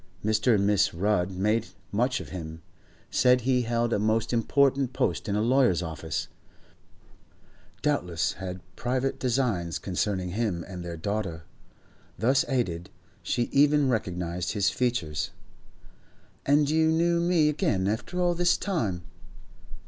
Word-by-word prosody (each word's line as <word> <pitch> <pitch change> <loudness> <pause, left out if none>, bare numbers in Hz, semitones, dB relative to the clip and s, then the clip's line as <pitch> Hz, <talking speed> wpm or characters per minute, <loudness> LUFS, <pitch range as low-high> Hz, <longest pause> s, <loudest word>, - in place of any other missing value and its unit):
Mr. 110 +2 +3
and 100 -1 +2
Mrs. 100 -4 +2
Rudd 100 -2 +1
made 105 +4 0 0.2
much 125 +4 +1
of - - -8
him, 80 -2 -7 0.5
said 125 0 +5
that 125 - -9
he 130 -1 +3
held 120 0 0
a - - +1
most 110 +3 +1
important 135 +2 +2
post 115 - -1
in 100 - 0
a 105 - +1
lawyer's 120 -8 +3
office, 80 -1 -4 1.6
doubtless 90 - 0
had 90 -1 -6
private 130 +2 -1
designs 115 -10 0
concerning 95 0 -2
him 95 -4 -2
and 90 -3 -7
their 85 -1 -6
daughter. 95 -3 -3 0.7
Thus 130 +7 +3
aided, 90 - -1 0.3
she 120 - 0
even 145 0 +4
recognised 90 -5 -2
his 105 -3 +2
features. 110 - -1 1.2
'And 145 +1 +4
you 160 +2 +3
knew 170 +2 +2
me 170 -3 +3
again 145 - +1
after 110 - -2
all 175 -1 +2
this 175 0 +2
time? 110 - -2
110 Hz, 135 wpm, -27 LUFS, 90-135 Hz, 1.6 s, said